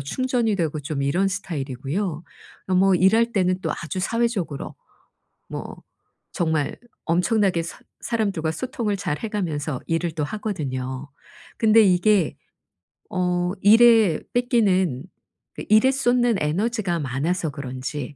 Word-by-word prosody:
충전이 230 - 0
되고 155 -4 -1
좀 140 -1 -3
이런 180 +8 +1
스타일이고요. 155 -1 -4 0.5
어 185 - +1
뭐 190 +1 +4
일할 225 +6 +3
때는 185 -2 +1
또 - - -1
아주 175 +3 -4
사회적으로 210 - -2 0.7
뭐 - - -7 0.6
정말 160 -4 -1 0.3
엄청나게 180 +1 +2
사 165 - -8 0.2
사람들과 200 -9 -1
소통을 220 - -3
잘 150 -5 -3
해가면서 160 - -3
일을 165 +1 -1
또 150 - 0
하거든요. 140 -9 -4 0.5
근데 225 0 +6
이게 185 -4 +3 0.7
어 180 -1 0
일에 220 -4 +6
뺏기는 195 - +2 0.5
그 - - -6
일에 215 +5 +6
쏟는 245 -3 +2
에너지가 185 +3 -1
많아서 150 +5 -1
그런지 140 0 -6
180 Hz, 265 characters per minute, -23 LUFS, 150-215 Hz, 0.7 s, 근데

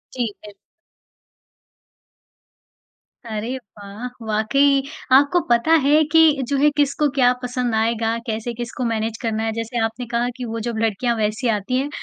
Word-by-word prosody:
ठीक 235 -5 -2
है। 205 - -11 2.8
अरे 225 +4 -3
वाह! 205 0 -10 0.2
वाक़ई 275 +6 +2 0.3
आपको 285 +5 +3
पता 235 +6 +3
है 295 +3 +4
कि 320 -3 +5
जो 280 - 0
है 295 +2 +4
किसको 290 +1 +2
क्या 250 -1 +5
पसंद 245 -2 -1
आएगा? 225 0 0
कैसे 225 +2 -3
किसको 240 +2 -5
मैनेज 225 -1 -2
करना 225 -2 -1
है। 225 - -1
जैसे 230 +1 -3
आपने 235 +2 -5
कहा 240 +1 +1
कि 250 - -5
वो 230 0 -4
जब 235 - -3
लड़कियाँ 225 +2 0
वैसी 215 +3 -1
आती 215 +4 0
हैं, 280 - -2
235 Hz, 150 wpm, -21 LUFS, 220-265 Hz, 2.8 s, कि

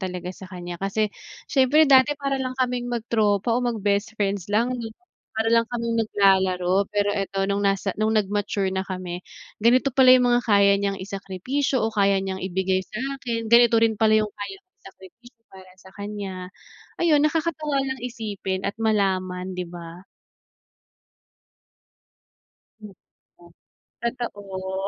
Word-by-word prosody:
talaga 180 -1 -5
sa 190 0 -12
kanya, 175 -2 -8
kasi 200 +2 -1 0.4
siyempre 280 +3 +5
dati 275 +1 +5
para 275 -1 -2
lang 255 0 -4
kaming 250 -1 -1
mag 235 -2 -3
tropa 210 0 +2
oo 245 - +1
mag 240 -2 -1
best 205 +2 0
friends 200 -2 -2
lang, 230 +4 +1
eh, 235 -3 -4 0.4
para 220 +1 0
lang 230 0 +4
kaming 235 -1 -2
naglalaro 190 -2 +2
pero 205 0 +1
eto 195 -1 -2
nung 200 +1 0
nasa 195 0 0
nung 215 +1 +1
nag-mature 205 -2 0
na 190 0 -2
kami 180 -1 -6 0.4
ganito 255 +4 +4
pala 260 -1 +7
'yung 250 -1 +5
mga 240 0 +3
kaya 200 -2 +5
niyang 200 -1 -2
isakripisyo 200 +8 -2
o 220 - +1
kaya 200 -2 +3
niyang 190 -1 -4
ibigay 190 0 0
sa'kin, 240 -1 -4
ganito 235 0 +6
rin 225 -1 +3
pala 215 0 +4
'yung 215 - 0
kaya 210 - -7
kong 370 -1 -62
isakripisyo 230 +6 -16
para 185 -1 -14
sa 190 - -16
kanya, 200 -3 -6 0.5
ayun 310 -4 +4
nakakatuwa 305 -2 0
lang 265 -1 -3
isipin 205 -6 -4
at 200 - -2
malaman, 190 -4 -1
di 180 - -3
ba? 170 0 -10 2.8
Mm. 210 -2 -11 1.1
Totoo. 200 -5 -4
205 Hz, 145 wpm, -24 LUFS, 190-240 Hz, 2.8 s, pala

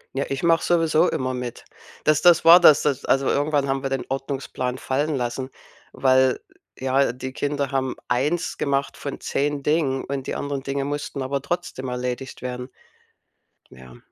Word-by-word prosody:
Ja, 135 - 0
ich 135 0 -3
mache 165 -1 +3
sowieso 165 0 +3
immer 130 0 -2
mit. 125 -1 -6 0.4
Das 155 0 +3
das 175 -2 +5
war 170 +2 +10
das, 155 -4 +7
dass 140 -4 -1
also, 135 0 +2
irgendwann 145 -1 +1
haben 135 0 -1
wir 135 - -1
den 135 -1 -2
Ordnungsplan 135 -2 -3
fallen 145 +4 -1
lassen, 130 +1 -3 0.4
weil 130 -1 +3 0.4
ja, 130 0 +2
die 130 +1 -7
Kinder 145 -1 -2
haben 130 -1 -1
eins 150 +9 0
gemacht 140 -1 -1
von 140 - -6
10 145 0 -2
Dingen 145 -3 +1
und 135 -1 -4
die - - -3
anderen 140 -1 -3
Dinge 140 0 -2
mussten 145 -1 -4
aber 135 +1 -2
trotzdem 155 -5 -4
erledigt 125 +1 -4
werden. 125 0 -5 1.0
Ja. 65 -1 -14
135 Hz, 165 wpm, -23 LUFS, 130-145 Hz, 1.0 s, war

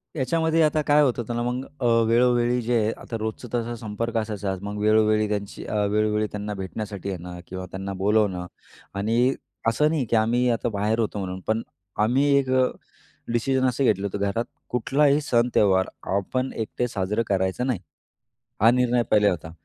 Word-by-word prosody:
याच्यामध्ये 160 +3 +1
आता 155 0 +2
काय 150 0 +4
होत 130 -4 +3
होतं 120 0 -3
ना 120 - -1
मग 125 +2 -2
अ, 125 - -2 0.2
वेळोवेळी 120 +1 +3
जे 120 +1 +1 0.2
आता 115 - -6
रोजचं 110 +3 -4
तसा 120 0 -1
संपर्क 115 +1 -4
असायचाच, 105 -4 -3
मग 105 +1 -5
वेळोवेळी 110 0 +3
त्यांची 100 -1 -4 0.3
वेळोवेळी 105 0 +1
त्यांना 105 0 -4
भेटण्यासाठी 100 0 -5
येणं 90 -1 -6
किंवा 95 0 -6
त्यांना 95 +1 -5
बोलावणं 100 -2 +1 0.5
आणि 115 +6 +2 0.3
असं 130 +7 +3
नाही, 155 -5 0
की 115 - 0
आम्ही 120 +3 +2
आता 120 0 0
बाहेर 105 +2 0
होतो 105 -2 -1
म्हणून, 95 -1 -4
पण 110 +1 +1 0.4
आम्ही 125 +6 +2
एक 135 -2 0
अ, 130 0 +4 0.7
डिसिजन 130 +3 +1
असं 130 +2 0
घेतलं 100 -5 +2
होतं, 100 +1 -5
घरात 100 +4 -1 0.2
कुठलाही 140 +4 +2
सण-त्योहार 115 -8 +2 0.3
आपण 130 +7 -1
एकटे 115 +2 -2
साजरं 105 0 -1
करायचं 95 +5 0
नाही 120 -9 0 0.8
हा 115 +2 +7
निर्णय 125 -1 +2
पहिले 105 -1 +5
होता, 80 -3 -4
110 Hz, 165 wpm, -24 LUFS, 100-125 Hz, 0.8 s, हा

